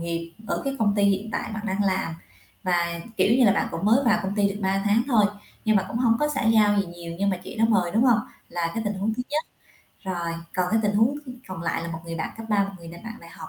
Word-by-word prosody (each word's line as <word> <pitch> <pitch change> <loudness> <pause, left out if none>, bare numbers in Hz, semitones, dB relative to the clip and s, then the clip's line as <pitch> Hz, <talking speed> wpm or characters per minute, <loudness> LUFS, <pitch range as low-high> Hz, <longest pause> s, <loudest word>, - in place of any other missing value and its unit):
nghiệp 170 0 -4
ở, - - -1
cái, 275 0 -2
công 205 -2 +2
ty 205 - +2
hiện 200 +2 +1
tại 225 - -3
bạn 220 0 -5
đang 200 0 0
làm 190 -4 0 0.5
và, 170 -2 0 0.2
kiểu 220 - +4
như, 255 - +6
là 200 - +6
bạn - - 0
cũng 165 - -4
mới 230 +7 +4
vào 225 -3 +4
công 195 +1 -2
ty 205 -1 +3
được 200 +1 -5
3 195 0 +1
tháng 210 +3 +4
thôi 230 -6 +4 0.4
nhưng 215 -1 +4
mà 195 - +3
cũng - - -4
hông 235 -2 +3
có 295 - +2
xã 300 - -1
giao 215 -2 +5
gì 195 - -2
nhiều, 170 -1 -8
nhưng 200 0 +2
mà 185 - 0
chị 180 - -10
đó 225 - +4
mời, 185 -6 +2
đúng 225 +7 +3
hông? 240 -4 +5 0.3
Là 170 -1 -2
cái 225 - -1
tình 205 0 -1
huống 205 +3 -1
thứ 250 - -2
nhất. 305 +2 0 0.6
Rồi 175 -3 -2 0.2
còn, 180 -1 +1
cái, 225 - +3
tình 205 -1 +2
huống 230 +7 +3
th 295 -3 -15 0.2
còn 185 -3 -6
lại 165 0 -1
là 170 - -4
một 165 -1 -5
người 165 0 -5
bạn 160 - -3
cấp 225 0 -8
3, 205 -1 +3
một 200 - -6
người 170 -1 -11
nà 170 +1 -9
bạn 225 0 -6
đại 170 - -13
học - - -10
200 Hz, 295 wpm, -25 LUFS, 175-225 Hz, 0.6 s, như